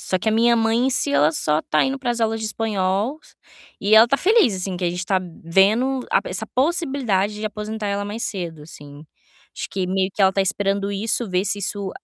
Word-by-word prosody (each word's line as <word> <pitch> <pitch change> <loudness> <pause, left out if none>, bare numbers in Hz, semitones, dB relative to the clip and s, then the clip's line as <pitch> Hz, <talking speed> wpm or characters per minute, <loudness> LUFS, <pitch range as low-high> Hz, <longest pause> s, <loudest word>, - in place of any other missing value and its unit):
Só 185 - -1
que 220 - 0
a - - 0
minha 235 +1 +3
mãe, 225 +2 +1
em - - +2
si, 195 - 0
ela 145 +2 +4
só 155 -1 0
tá 155 - +1
indo 270 +1 -2
para 255 - -5
as 235 -1 -2
aulas 225 0 0
de 220 - -3
espanhol, 215 +4 -1 0.6
e 205 +2 +2
ela 220 +2 +7
tá 275 - +2
feliz, 400 - +3
assim, 185 -1 -4
que 180 - -3
a - - +2
gente 180 +1 -4
tá 190 0 +1 0.3
vendo 220 +10 +2
a - - +3
essa 210 +4 -5
possibilidade 260 - 0
de 210 - -6
aposentar 215 0 -5
ela 200 0 -2
mais 210 +3 -5
cedo, 170 -6 -5
assim. 145 -1 -13 0.5
Acho - - -5
que 190 -2 -2
meio 190 +1 0
que 205 - 0
ela 190 - +5
está 195 - -1
esperando 200 0 -1
isso, 215 +2 +1
ver 185 +1 0
se 205 - -1
isso 200 -1 -2
205 Hz, 230 wpm, -21 LUFS, 185-230 Hz, 0.6 s, ela